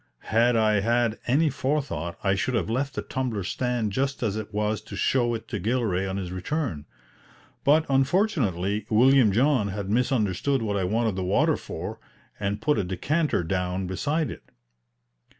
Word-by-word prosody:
Had 120 Hz, +2 st, +4 dB
I 110 Hz, -2 st, +3 dB
had 115 Hz, +1 st, +1 dB
any 145 Hz, +5 st, +3 dB
forethought 130 Hz, -, -2 dB
I 95 Hz, 0 st, +3 dB
should 120 Hz, +6 st, -1 dB
have 110 Hz, -, -1 dB
left 135 Hz, +3 st, -1 dB
the -, -, -3 dB
tumbler 125 Hz, -7 st, -3 dB
stand 120 Hz, +2 st, -1 dB
just 135 Hz, +5 st, -1 dB
as 105 Hz, -3 st, 0 dB
it 110 Hz, -1 st, -5 dB
was 105 Hz, 0 st, -1 dB
to 110 Hz, -, -9 dB
show 120 Hz, -3 st, +1 dB
it 115 Hz, -, -7 dB
to 105 Hz, -, -3 dB
Gilray 105 Hz, -3 st, 0 dB
on 95 Hz, -, -3 dB
his 90 Hz, -2 st, -4 dB
return. 95 Hz, -, -3 dB, 0.8 s
But, 155 Hz, +3 st, +4 dB
unfortunately, 130 Hz, -, +1 dB
William 125 Hz, 0 st, +5 dB
John 125 Hz, 0 st, +2 dB
had 100 Hz, 0 st, -4 dB
misunderstood 120 Hz, +1 st, +1 dB
what 105 Hz, -2 st, -1 dB
I 95 Hz, -2 st, 0 dB
wanted 110 Hz, +1 st, 0 dB
the 95 Hz, -, -1 dB
water 90 Hz, +2 st, +2 dB
for, -, -, -6 dB, 0.4 s
and 100 Hz, +3 st, -2 dB
put 150 Hz, -6 st, +2 dB
a -, -, +1 dB
decanter 140 Hz, -, 0 dB
down 90 Hz, +2 st, -2 dB
beside 145 Hz, -, -1 dB
it. -, -, -11 dB
110 Hz, 170 wpm, -26 LUFS, 100-135 Hz, 0.8 s, William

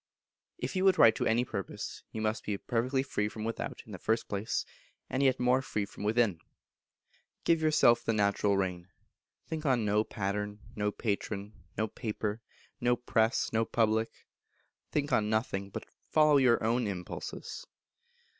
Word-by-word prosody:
If -, -, -4 dB
you 185 Hz, -, +1 dB
would 190 Hz, -1 st, +5 dB
write 115 Hz, -, +8 dB
to -, -, 0 dB
any 120 Hz, +2 st, +2 dB
purpose, 100 Hz, -5 st, -5 dB
you 110 Hz, -, -4 dB
must 110 Hz, +1 st, -1 dB
be 105 Hz, -2 st, -2 dB
perfectly 125 Hz, +5 st, 0 dB
free 105 Hz, -6 st, -1 dB
from 110 Hz, 0 st, -7 dB
without, 115 Hz, +1 st, -4 dB
in 110 Hz, -, -12 dB
the 95 Hz, -, -7 dB
first 110 Hz, +4 st, 0 dB
place, 100 Hz, +1 st, -2 dB, 0.5 s
and 130 Hz, -, 0 dB
yet 130 Hz, -2 st, +3 dB
more 125 Hz, +1 st, +3 dB
free 105 Hz, -6 st, -2 dB
from 100 Hz, -, -10 dB
within. 105 Hz, -4 st, +2 dB, 1.0 s
Give 165 Hz, -1 st, +3 dB
yourself 150 Hz, -7 st, +4 dB
the -, -, +1 dB
natural 100 Hz, -1 st, +2 dB
rein; 90 Hz, -2 st, -2 dB, 0.6 s
think 160 Hz, -1 st, -4 dB
on 130 Hz, -7 st, +2 dB
no 105 Hz, +1 st, +3 dB
pattern, 105 Hz, 0 st, -3 dB, 0.2 s
no 105 Hz, 0 st, 0 dB
patron, 105 Hz, -1 st, -3 dB, 0.2 s
no 110 Hz, -, +1 dB
paper, 110 Hz, 0 st, -3 dB, 0.4 s
no 120 Hz, 0 st, +3 dB
press, 115 Hz, -1 st, +1 dB
no 110 Hz, 0 st, +3 dB
public; 110 Hz, -1 st, +1 dB, 0.8 s
think 145 Hz, -1 st, 0 dB
on 105 Hz, -1 st, +2 dB
nothing, 105 Hz, -3 st, -1 dB
but -, -, -6 dB, 0.2 s
follow 155 Hz, -2 st, +5 dB
your 125 Hz, -5 st, +4 dB
own 115 Hz, +1 st, +1 dB
impulses. 90 Hz, -3 st, -6 dB
110 Hz, 160 wpm, -31 LUFS, 105-125 Hz, 1.0 s, write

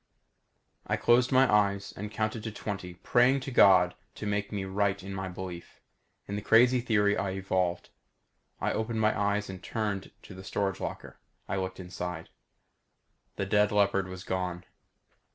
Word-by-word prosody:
I -, -, 0 dB
closed 120 Hz, +2 st, +3 dB
my 130 Hz, 0 st, +5 dB
eyes 100 Hz, -1 st, +2 dB
and 105 Hz, +2 st, -5 dB
counted 110 Hz, +1 st, -2 dB
to 110 Hz, -, -3 dB
twenty 95 Hz, -4 st, -6 dB
praying 125 Hz, +8 st, +3 dB
to 135 Hz, -, -6 dB
God 90 Hz, -6 st, +6 dB, 0.2 s
to -, -, -6 dB
make 100 Hz, 0 st, -1 dB
me 100 Hz, -2 st, -3 dB
right 100 Hz, 0 st, 0 dB
in 95 Hz, 0 st, -6 dB
my 95 Hz, -1 st, -4 dB
belief 90 Hz, -1 st, -8 dB, 0.5 s
in 100 Hz, -, -4 dB
the 105 Hz, -, -3 dB
crazy 120 Hz, +4 st, +5 dB
theory 105 Hz, -4 st, +2 dB
I 100 Hz, -, -1 dB
evolved. 95 Hz, -2 st, -1 dB, 0.7 s
I -, -, 0 dB
opened 110 Hz, 0 st, -2 dB
my 110 Hz, 0 st, +2 dB
eyes 100 Hz, 0 st, 0 dB
and 95 Hz, -1 st, -8 dB
turned 105 Hz, -3 st, -3 dB
to -, -, -11 dB
the 95 Hz, 0 st, -10 dB
storage 95 Hz, 0 st, -2 dB
locker. -, -, -6 dB, 0.3 s
I 95 Hz, -, -2 dB
looked 95 Hz, 0 st, -4 dB
inside. 90 Hz, -2 st, -6 dB, 1.1 s
The 100 Hz, -, -2 dB
dead 105 Hz, +1 st, +3 dB
leopard 100 Hz, -2 st, +2 dB
was 95 Hz, 0 st, -8 dB
gone. 90 Hz, -2 st, -3 dB
100 Hz, 165 wpm, -29 LUFS, 95-105 Hz, 1.1 s, God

